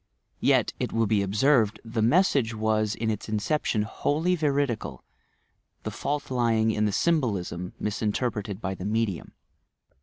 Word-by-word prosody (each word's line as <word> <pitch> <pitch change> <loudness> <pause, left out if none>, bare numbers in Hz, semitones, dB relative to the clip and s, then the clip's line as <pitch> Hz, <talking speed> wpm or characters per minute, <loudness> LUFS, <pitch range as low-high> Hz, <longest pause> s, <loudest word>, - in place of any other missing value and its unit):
Yet, - - +3
it - - -2
will 115 0 +1
be 105 -1 +2
ob 100 0 -4
•erwd, 110 -2 +3
the 115 0 -2
nkeseage 125 - +3
was 110 -1 0
in 110 0 -1
its 105 0 -5
inception 110 +1 0
wholly 155 +10 0
veridical 140 -7 -1 0.8
the - - -4
f»ah 145 +1 -2
lying 115 -3 +2
in 105 0 0
the 105 - +1
symbolism, 100 - 0
minnterpreted 105 -1 -2
by 95 -3 -3
the 95 0 -7
medium. 105 -4 -1
110 Hz, 145 wpm, -26 LUFS, 105-130 Hz, 0.8 s, Yet